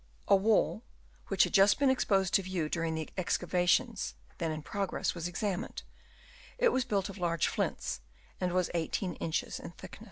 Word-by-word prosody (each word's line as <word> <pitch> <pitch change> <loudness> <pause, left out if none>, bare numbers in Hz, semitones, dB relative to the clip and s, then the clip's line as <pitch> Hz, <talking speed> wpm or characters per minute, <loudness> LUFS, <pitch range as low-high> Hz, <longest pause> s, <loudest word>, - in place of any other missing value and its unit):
A - - +7
wall, 215 +2 +2 0.5
which - - +4
had - - -1
just 195 0 +6
been 275 -2 +4
exposed 195 -7 +2
to - - +5
view 180 -4 -2
during 165 -1 -1
the 160 -1 -3
excavations 180 +6 +1 0.2
then 165 -2 0
in 155 -1 -5
progress, 200 +2 -1
was 170 -1 -3
examined; 185 +1 -3 0.7
it - - +4
was 260 - +1
built 200 -2 0
of 200 0 -9
large 170 -2 +1
flints, 65 -1 -2 0.4
and 180 -1 0
was 180 0 +1
18 175 +2 -1
inches 160 - -2
in - - -7
thickness. - - -11
185 Hz, 170 wpm, -31 LUFS, 170-200 Hz, 0.7 s, A